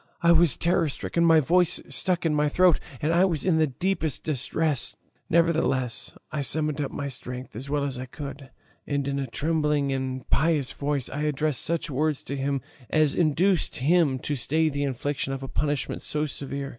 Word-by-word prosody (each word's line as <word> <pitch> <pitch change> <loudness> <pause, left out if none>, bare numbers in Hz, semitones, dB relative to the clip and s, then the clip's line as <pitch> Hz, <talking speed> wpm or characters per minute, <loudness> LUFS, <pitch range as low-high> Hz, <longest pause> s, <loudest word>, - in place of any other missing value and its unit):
I 170 - +6
was 170 -4 +4
terror 170 -2 +2
stricken, 170 +4 -1
my 165 -1 +6
voice 175 +4 +3
stuck 180 -2 0
in 160 - +2
my 150 0 +2
throat, 180 +1 +4 0.2
and 160 +2 +2
I 175 +2 +4
was 170 -6 0
in 170 -4 +3
the 155 - +4
deepest 160 +1 -2
distress; 150 0 0 0.3
nevertheless 155 -7 +1
I 150 - -2
summoned 150 +1 0
up 140 - -2
my 140 - -4
strength 125 -2 -7
as 130 +5 -6
well 145 0 0
as 135 -3 -3
I 130 - -6
could, 140 0 -8 0.4
and 140 -1 -1
in 140 0 -1
a 135 - -2
trembling 150 +2 0
and 130 -1 -4
piteous 150 -3 +2
voice 140 -3 -2
I 145 - -4
addressed 150 -2 0
such 165 -2 -1
words 150 +2 0
to 140 - -4
him 135 0 -1 0.3
as 155 -2 +3
induced 175 +2 +2
him 145 0 +2
to 145 - -1
stay 155 +4 +1
the 145 -1 -2
infliction 135 +1 -2
of 135 0 -5
a - - -4
punishment 145 0 -2
so 150 0 +1
severe. 140 -1 -4
150 Hz, 190 wpm, -26 LUFS, 135-160 Hz, 0.4 s, I